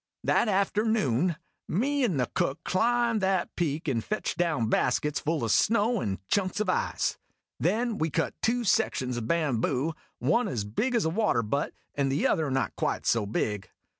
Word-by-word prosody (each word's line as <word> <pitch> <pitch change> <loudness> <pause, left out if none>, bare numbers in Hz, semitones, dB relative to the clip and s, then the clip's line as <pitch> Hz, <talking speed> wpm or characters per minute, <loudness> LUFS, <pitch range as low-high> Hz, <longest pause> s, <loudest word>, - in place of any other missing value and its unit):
That - - +2
afternoon 195 - +1 0.3
me 275 - 0
and 185 - +1
the 125 - +2
Cook 135 - -1
climbed 235 +2 +1
that 190 -2 0
peak 160 -2 -2
and 120 -6 0
fetched 215 - -2
down 155 -10 0
baskets 150 +5 +1
full 160 -3 -1
of 115 - 0
snow 230 - +3
and 95 -2 -2
chunks 190 -1 0
of 210 -3 +1
ice. - - -1 0.4
Then 220 +6 0
we 160 - +1
cut 165 +2 -1
two 240 +2 +1
sections 130 - +1
of 115 -2 -4
bamboo 145 -1 0 0.2
one 160 - +2
as 115 -6 -2
big 220 - -1
as 230 - +2
a - - +2
water 185 - +1
butt 140 +7 -2 0.2
and 140 -1 0
the 140 - 0
other 155 -3 +2
not 130 -5 -1
quite - - -2
so 110 -3 +2
big. 105 -1 -2
165 Hz, 175 wpm, -28 LUFS, 130-215 Hz, 0.4 s, snow